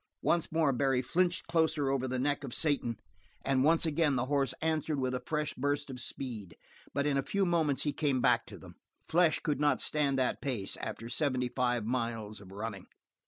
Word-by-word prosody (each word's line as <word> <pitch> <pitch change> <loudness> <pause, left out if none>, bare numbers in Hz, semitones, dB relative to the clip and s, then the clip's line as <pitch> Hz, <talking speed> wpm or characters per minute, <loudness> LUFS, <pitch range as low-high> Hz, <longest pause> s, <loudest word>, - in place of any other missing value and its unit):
Once 170 -1 +2
more 160 -4 +3
Barry 130 0 +1
flinched 175 +7 +1
closer 160 -4 +1
over 130 -1 0
the 130 0 -2
neck 145 +2 0
of 130 -4 -5
Satan 140 -7 0 0.5
and 135 -1 +2
once 165 +3 +4
again 155 -2 +2
the 125 0 0
horse 140 0 0
answered 155 -2 0
with 130 -1 0
a 125 - -1
fresh 150 -1 -1
burst 145 +1 -1
of 125 - -7
speed, 120 -7 -5 0.3
but 140 - 0
in 140 -2 +2
a - - +2
few 200 +7 0
moments 160 -6 +2
he 145 - 0
came 140 -4 +1
back - - +3
to - - -9
them. - - -13 0.3
Flesh 170 -1 +3
could 150 -3 0
not 145 -3 +3
stand 145 -3 +1
that 130 -1 0
pace 120 -8 -1
after 115 - -5
seventy 125 -1 0
five 125 -3 0
miles 115 -3 -2
of 95 -1 -13
running. 100 -1 -6
135 Hz, 200 wpm, -31 LUFS, 125-150 Hz, 0.5 s, once